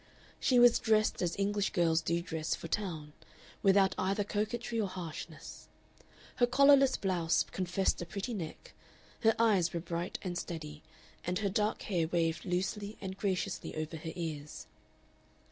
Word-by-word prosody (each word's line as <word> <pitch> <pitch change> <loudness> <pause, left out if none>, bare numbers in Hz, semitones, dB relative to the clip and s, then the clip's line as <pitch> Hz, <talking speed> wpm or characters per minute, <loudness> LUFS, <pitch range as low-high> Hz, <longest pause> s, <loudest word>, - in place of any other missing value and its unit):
She 255 - +3
was 240 -1 +7
dressed 215 -1 +2
as 175 -2 -1
English 200 0 +1
girls 165 -3 +3
do 170 +1 -1
dress 160 -2 -2
for - - -8
town, 160 -6 -3 0.5
without 195 -1 +4
either 195 +2 +1
coquetry 225 +3 -2
or 205 - 0
harshness: 180 -4 -8 0.7
her 245 - +4
collarless 275 0 +6
blouse 175 -4 +1
confessed 185 0 0
a - - -3
pretty 200 +6 -4
neck, 170 -7 -7 0.5
her 225 -1 +4
eyes 200 -7 +3
were 170 - -1
bright 170 +2 -4
and 180 -2 -3
steady, 155 -3 -6 0.4
and 180 +1 -1
her 200 0 0
dark 210 +1 0
hair 175 -5 0
waved 165 -1 0
loosely 200 +3 -2
and 190 -1 -5
graciously 195 -1 -2
over 155 +1 -4
her 160 +1 -6
ears.... 155 -4 -5
185 Hz, 150 wpm, -32 LUFS, 170-210 Hz, 0.7 s, was